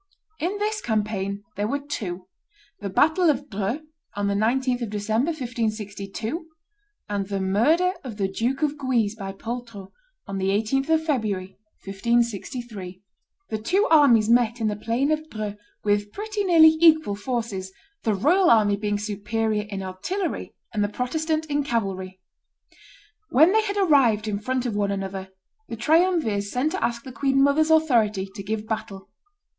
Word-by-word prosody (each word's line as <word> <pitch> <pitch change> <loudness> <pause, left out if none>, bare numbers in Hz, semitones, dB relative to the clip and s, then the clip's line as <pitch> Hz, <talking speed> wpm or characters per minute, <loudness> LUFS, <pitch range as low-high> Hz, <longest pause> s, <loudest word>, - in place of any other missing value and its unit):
In 360 +6 -1
this 425 +1 -1
campaign 205 -3 -2
there 205 +1 -1
were 280 - 0
two; 200 -11 -5 0.5
the 200 - -4
battle 315 - +3
of 285 -3 -1
Dreux, 210 +8 -2 0.3
on 205 0 -1
the 200 - +1
19th 245 +4 +1
of 235 - -3
December, 215 +5 0
1562; 225 - -4 0.6
and 200 -1 -2
the 200 -1 -2
murder 290 - +2
of 235 -6 -7
the 195 -2 0
Duke 240 +9 -1
of 300 0 0
Guise 240 -6 +1
by 195 -3 -6
Poltrot, 230 -1 -7 0.3
on 195 0 -4
the 190 - 0
18th 225 +8 0
of 320 0 +2
February, 205 - -1 0.3
1563. 220 -2 -2 0.5
The 220 - -1
two 375 - +1
armies 260 -9 +6
met 235 0 +3
in 220 -1 +1
the 210 - -2
plain 235 +7 0
of 310 0 -1
Dreux 215 -2 -4 0.3
with 205 0 +1
pretty 420 - -3
nearly 320 -3 +7
equal 315 -9 +5
forces, 205 -3 -3 0.3
the 220 -3 +1
royal 345 - +4
army 210 -3 +4
being 205 0 -1
superior 210 +1 -2
in 195 -2 -4
artillery 330 - -4 0.2
and 210 -2 +1
the 205 - 0
Protestant 310 +7 -1
in 290 -1 0
cavalry. 195 -7 -3 1.1
When 315 +8 +6
they 440 - +5
had 410 -1 -3
arrived 265 - +3
in 205 -1 -1
front 255 +3 -2
of 230 -4 -2
one 205 -1 0
another, 195 -1 -4 0.4
the - - -4
triumvirs 300 - +2
sent 255 +8 0
to 375 - -2
ask 235 0 -1
the 265 - -8
queen 270 +1 +2
mother's 300 +3 +3
authority 230 -11 +3
to 200 - -7
give 215 +2 -3
battle. 200 -3 -5
225 Hz, 160 wpm, -24 LUFS, 205-290 Hz, 1.1 s, nearly